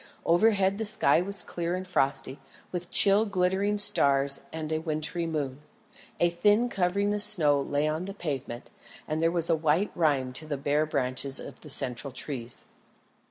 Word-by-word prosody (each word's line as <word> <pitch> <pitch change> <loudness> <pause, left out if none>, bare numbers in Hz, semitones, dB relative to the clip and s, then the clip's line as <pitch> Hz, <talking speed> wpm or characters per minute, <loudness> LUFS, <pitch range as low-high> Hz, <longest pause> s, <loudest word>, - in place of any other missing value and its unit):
Overhead 195 +2 +2
the 220 - -2
sky 205 -4 +2
was 200 +2 +4
clear 170 0 -4
and 185 0 -5
frosty, 135 -5 -1 0.3
with 175 -1 -5
chill 200 +1 +5
glittering 200 0 0
stars 140 -8 +4
and 160 -1 -6
a 155 - 0
wintry 160 +1 -3
moon. 145 -4 -4 0.6
A 175 0 +2
thin 205 +7 +2
covering 200 +1 0
of 210 - -2
snow 150 -9 +3
lay 145 +2 -1
on 155 +3 -3
the 195 +1 -8
pavement, 140 -8 -6 0.4
and 155 +1 -2
there 165 - +3
was 170 -1 0
a 165 - +2
white 160 +5 0
rime 140 -6 0
on 155 - -12
the 145 -2 -3
bare 145 +2 0
branches 135 -1 -2
of - - -10
the 150 - -12
central 125 -1 0
trees. 125 -2 -5
160 Hz, 170 wpm, -27 LUFS, 140-190 Hz, 0.6 s, chill